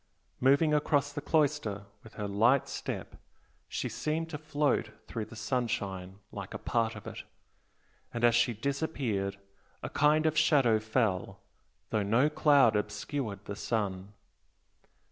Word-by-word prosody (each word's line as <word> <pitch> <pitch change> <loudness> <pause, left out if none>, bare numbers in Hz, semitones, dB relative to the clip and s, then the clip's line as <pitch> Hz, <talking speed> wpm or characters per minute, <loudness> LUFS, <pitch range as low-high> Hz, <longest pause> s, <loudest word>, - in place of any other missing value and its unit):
Moving 140 +4 +4
across 145 -1 +2
the 145 - -4
cloister 145 -11 0 0.2
with 115 - -14
her 105 -2 -3
light 115 +7 +3
step - - -5 0.5
she - - -3
seemed 160 +2 -2
to 150 - -4
float 145 -6 0 0.2
through 110 -2 -4
the - - -12
sunshine 100 -5 -2
like 100 -2 -7
a - - -1
part 115 -2 0
of - - -10
it, - - -6 0.9
and 120 - -4
as 120 -1 +6
she 120 +1 +3
disappeared 120 -6 -2 0.5
a - - -3
kind 150 +2 +3
of 155 0 +2
shadow 140 -8 +4
fell, 110 -3 -1 0.5
though 110 - +1
no 115 +9 +3
cloud 145 -7 +5
obscured 105 +1 -3
the 100 - -5
sun. 100 -2 -2
120 Hz, 140 wpm, -30 LUFS, 105-145 Hz, 0.9 s, as